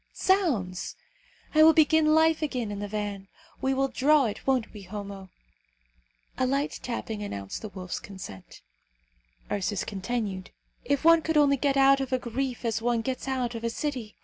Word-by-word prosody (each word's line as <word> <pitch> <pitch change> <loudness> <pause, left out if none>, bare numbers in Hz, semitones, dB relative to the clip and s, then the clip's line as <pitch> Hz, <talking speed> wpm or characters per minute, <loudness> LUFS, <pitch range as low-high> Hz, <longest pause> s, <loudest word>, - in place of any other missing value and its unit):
Zounds! 260 - 0 0.6
I 310 - +5
will 320 +1 +8
begin 315 0 +5
life 320 0 +4
again 250 -8 -2
in 205 - -5
the 205 - -4
van. 205 -1 -4 0.3
We 265 0 +1
will 270 +1 +2
draw 280 +2 +3
it, 210 +2 -5
won't 255 -4 +1
we, 210 - -9
Homo?" 195 0 -8 1.1
A 255 - +2
light 275 +3 -1
tapping 225 -3 -4
announced 100 - -5
the 215 - -6
wolf's 185 -2 -5
consent. 140 - -10 0.9
Ursus 200 0 -1
continued, 195 -2 -4 0.3
"If 285 +2 -1
one 330 0 +7
could 320 0 0
only 285 -1 +5
get 275 0 +1
out 275 0 +5
of 265 -1 -4
a 255 - +3
grief 250 +1 -3
as 225 -1 0
one 235 0 +1
gets 260 +3 -4
out 255 -2 -1
of 230 0 -6
a 230 - 0
city! 250 -4 -4
245 Hz, 175 wpm, -27 LUFS, 205-280 Hz, 1.1 s, will